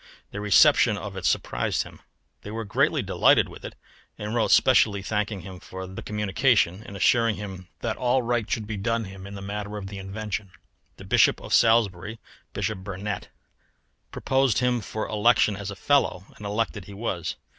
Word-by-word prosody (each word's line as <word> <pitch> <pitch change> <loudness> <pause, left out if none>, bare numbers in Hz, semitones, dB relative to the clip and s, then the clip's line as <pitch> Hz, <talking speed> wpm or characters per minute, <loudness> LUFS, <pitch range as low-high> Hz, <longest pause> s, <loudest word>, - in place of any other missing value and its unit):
Their 100 - -5
reception 105 -3 +5
of - - -7
it - - -5
surprised - - 0
him; - - -14 0.4
they - - -9
were 110 +1 -4
greatly 100 - +1
delighted - - +4
with - - -12
it, - - -7 0.4
and 105 +1 -5
wrote 115 -2 +1
specially 105 -6 +4
thanking 105 -1 -2
him 95 -1 -10
for 95 0 -8
the 95 +1 -8
communication, 105 -2 +1
and 100 - -9
assuring 115 +2 +3
him 95 -3 -8
that 115 -2 -2
all 125 +1 +1
right 120 -2 -1
should 110 - -1
be 105 0 -5
done 115 +3 -1
him 95 -1 -9
in 100 - -8
the 100 - -7
matter 105 +1 -5
of 100 - -6
the 100 0 -7
invention. 100 0 -5 0.4
The - - -11
Bishop - - +4
of - - -6
Salisbury 110 -2 +3 0.3
(Bishop 110 -3 -3
Burnet) 100 +1 -5 0.8
proposed 135 -4 +1
him 125 -1 +1
for 110 +1 -4
election 110 -1 +3
as 100 0 -6
a 100 - -6
fellow, 130 -8 +1
and 105 - -7
elected 105 -2 -2
he 100 +1 -10
was. 90 -7 -3
105 Hz, 180 wpm, -25 LUFS, 95-115 Hz, 0.8 s, reception